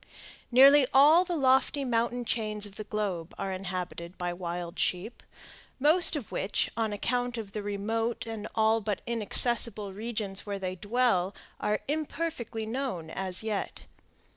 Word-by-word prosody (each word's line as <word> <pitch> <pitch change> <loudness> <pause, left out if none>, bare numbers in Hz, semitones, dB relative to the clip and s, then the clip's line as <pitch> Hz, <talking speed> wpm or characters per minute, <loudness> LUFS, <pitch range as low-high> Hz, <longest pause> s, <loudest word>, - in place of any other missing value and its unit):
Nearly 270 +2 +7
all 305 +6 +7
the 355 -1 -3
lofty 270 0 +2
mountain 240 0 0
chains 215 -3 0
of 200 -1 -9
the 215 - -7
globe 195 -6 -3
are 195 - -3
inhabited 180 -2 -5
by 175 -1 -2
wild 175 0 -5
sheep, 190 +7 0 0.6
most 325 +4 +4
of 270 -9 -5
which, 195 - -1
on 225 -2 0
account 245 +4 -1
of 215 -3 -6
the 210 - -4
remote 220 +4 -2
and 220 -2 -5
all 220 0 +3
but 205 -2 -3
inaccessible 230 -2 0
regions 210 -2 -4
where 200 -1 -4
they 185 -1 -3
dwell, 205 -2 +1 0.2
are 210 0 0
imperfectly 295 -6 -3
known 220 -9 -4
as 190 +1 0
yet. 215 -2 -3
220 Hz, 145 wpm, -29 LUFS, 195-245 Hz, 0.6 s, Nearly